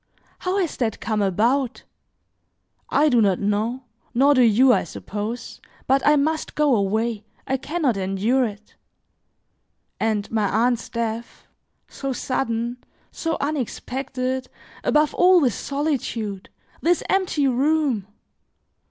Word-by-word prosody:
How 370 +2 -1
has 360 -6 -1
that 225 -4 -1
come 215 -2 -1
about? 235 +7 +1 1.1
I 300 +2 +3
do 245 -5 +4
not 195 -4 +3
know, 215 +6 -1 0.3
nor 275 +4 +5
do 255 - +4
you, 245 +3 +6
I - - +2
suppose; 215 +4 -6 0.2
but 270 +1 +3
I 295 - +5
must 310 +2 -1
go 295 -4 +3
away, 215 +2 0 0.2
I 265 - 0
can 325 +6 -4
not 245 -7 +2
endure 195 +7 +1
it. 210 -1 -9 1.2
And 215 -2 -1
my 215 -3 +1
aunt's 235 +3 +1
death, 230 0 -4 0.4
so 275 -1 -4
sudden, 240 -2 -2 0.3
so 325 -1 -2
unexpected, 260 -2 -3 0.3
above 300 0 +3
all 365 0 +6
this 255 -8 +2
solitude! 235 -8 -3 0.3
this 350 +1 +2
empty 365 -7 +1
room! 270 -5 +1
250 Hz, 125 wpm, -23 LUFS, 220-280 Hz, 1.2 s, you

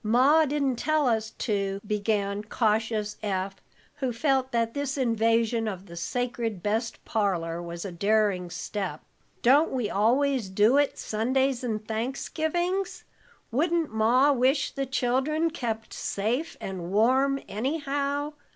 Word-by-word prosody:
Ma 265 +8 +5
didn't 280 -3 0
tell 310 +1 +1
us 220 -2 +1
to," 200 -3 -1
began 205 -1 -1
cautious 215 -1 0
Eph, 195 -1 -2 0.4
who 265 -3 -1
felt 265 +2 +1
that 230 -1 0
this 285 -1 -2
invasion 230 -2 +2
of 190 -2 -5
the 170 -3 -11
sacred 230 0 -3
best 225 +2 -2
parlor 175 -6 -1
was 170 +1 -6
a 195 - -4
daring 200 -1 +1
step. 175 -1 -4 0.4
"Don't 285 +6 +5
we 245 -6 -1
always 245 +2 +2
do 210 +7 +4
it 290 -1 +2
Sundays 255 +4 0
and 215 -3 -3
Thanksgivings? 320 - -2 0.5
Wouldn't 325 +2 +1
Ma 240 +6 +4
wish 265 +2 +2
the 275 -1 -3
children 270 +6 +1
kept 225 -7 -4
safe 240 +11 -2
and 185 -2 -5
warm 260 +6 +3
anyhow? 285 +4 -2
230 Hz, 130 wpm, -27 LUFS, 210-275 Hz, 0.5 s, Ma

